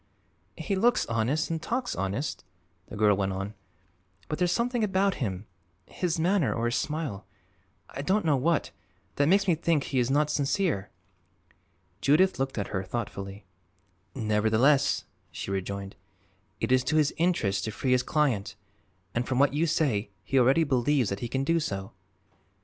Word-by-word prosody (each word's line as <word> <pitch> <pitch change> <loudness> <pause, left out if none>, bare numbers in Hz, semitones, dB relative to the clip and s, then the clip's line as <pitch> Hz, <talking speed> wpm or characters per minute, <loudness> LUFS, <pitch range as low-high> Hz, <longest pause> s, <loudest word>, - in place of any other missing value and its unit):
"He 200 - -2
looks 240 +6 +3
honest, 120 +9 0
and 160 -1 -2
talks 245 +6 -2
honest," 100 +10 -3 0.4
the - - -9
girl 105 -1 +4
went 95 0 -1
on, 100 +2 -4 0.7
"but 155 - -4
there's 180 -1 +2
something 240 +1 0
about 195 -1 +2
him 95 -4 -3 0.4
his 175 -3 -2
manner 170 - +2
or 115 - -1
his 120 +1 0
smile; 150 -10 -3 0.6
I 135 - -6
don't 190 +7 +1
know 150 -3 +4
what 155 +4 +1 0.5
that 145 - +3
makes 195 +3 +3
me 175 - +5
think 160 -2 +1
he 130 - -1
is 120 0 +1
not 150 +2 +2
sincere." 140 - 0 1.1
Judith 165 +4 +3
looked 135 -1 -2
at 100 - -2
her 95 -2 -2
thoughtfully. 100 -2 -5 0.7
"Nevertheless," 110 +6 +2 0.3
she 80 - -5
rejoined, 100 0 -4 0.6
"it - - -1
is 130 0 +4
to 155 - 0
his 150 -2 +3
interest 160 - +1
to 110 - -3
free 130 +4 -2
his 125 -1 +4
client, 130 -8 0 0.6
and 120 +1 -1
from 130 - -1
what 140 +1 +4
you 160 +3 +1
say 130 -10 0
he 135 - +2
already 135 +6 +4
believes 130 -3 +1
that 100 - -3
he 120 - -3
can 135 +3 -1
do 165 +4 +2
so." 95 -10 -4
135 Hz, 165 wpm, -28 LUFS, 105-160 Hz, 1.1 s, me